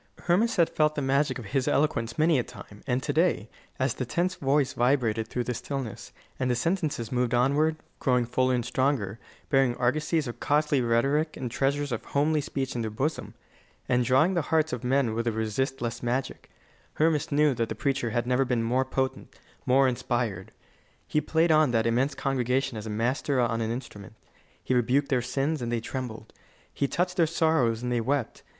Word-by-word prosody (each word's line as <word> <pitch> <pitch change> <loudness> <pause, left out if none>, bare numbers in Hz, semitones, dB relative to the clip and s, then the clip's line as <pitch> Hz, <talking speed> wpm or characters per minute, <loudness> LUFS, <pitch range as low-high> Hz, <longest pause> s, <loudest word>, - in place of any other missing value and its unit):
Hermas 200 +7 +2
had 170 -4 +4
felt 155 0 +2
the 145 - -1
magic 135 0 +1
of 120 - -8
his 130 +5 -1
eloquence 115 -6 0
many 155 -2 +3
a - - 0
time; 105 -2 -12
and 130 0 0
to 145 - -1
day, 160 - +1 0.3
as 130 -2 +1
the - - -4
tense 175 +9 -1
voice 140 -3 +1
vibrated 120 -3 +1
through 125 +2 -2
the 125 - -2
stillness, 130 -1 -5 0.3
and 130 - 0
the 125 - +2
sentences 150 - -1
moved 125 -1 +1
onward, 145 +6 +2 0.2
growing 125 -3 +2
fuller 130 +2 +1
and 120 -2 -2
stronger, 120 -5 0 0.3
bearing 135 -3 +3
argosies 150 +5 0
of 120 - -7
costly 145 -2 +2
rhetoric 135 +7 +1
and 125 -3 -4
treasures 140 +2 0
of 115 - -3
homely 150 +2 +1
speech 135 -1 -3
in 120 - -1
their 110 - -2
bosom, 135 +9 -3 0.5
and 125 0 +2
drawing 130 +9 +3
the 170 - +1
hearts 155 -2 +2
of 125 - -4
men 125 -2 +1
with 115 +1 -2
a - - +2
resistless 115 +2 -2
magic, 125 +2 -3 0.5
Hermas 155 -1 +1
knew 150 0 +3
that 115 -2 -2
the - - -3
preacher 135 -4 -1
had 120 0 -1
never 125 +2 +2
been 125 -3 0
more 125 +3 +1
potent, 130 0 -2 0.4
more 135 +1 +5
inspired. 120 -6 -2 0.5
He 150 - 0
played 160 +3 +2
on 155 -2 +5
that 115 -1 +2
immense 130 +5 +1
congregation 130 -2 0
as 110 0 -6
a - - -4
master 125 +5 0
on 115 -2 +1
an 110 - -1
instrument. 110 -5 -7 0.5
He - - 0
rebuked 125 +4 +2
their 130 -3 +2
sins, 135 +5 -1
and 120 -1 -3
they 120 - 0
trembled. 115 -2 -6 0.4
He 140 - 0
touched 180 +5 -1
their 165 -2 +4
sorrows, 155 -8 +1
and 125 - -2
they 120 -1 +1
wept. 135 0 -2
130 Hz, 195 wpm, -27 LUFS, 120-145 Hz, 0.5 s, more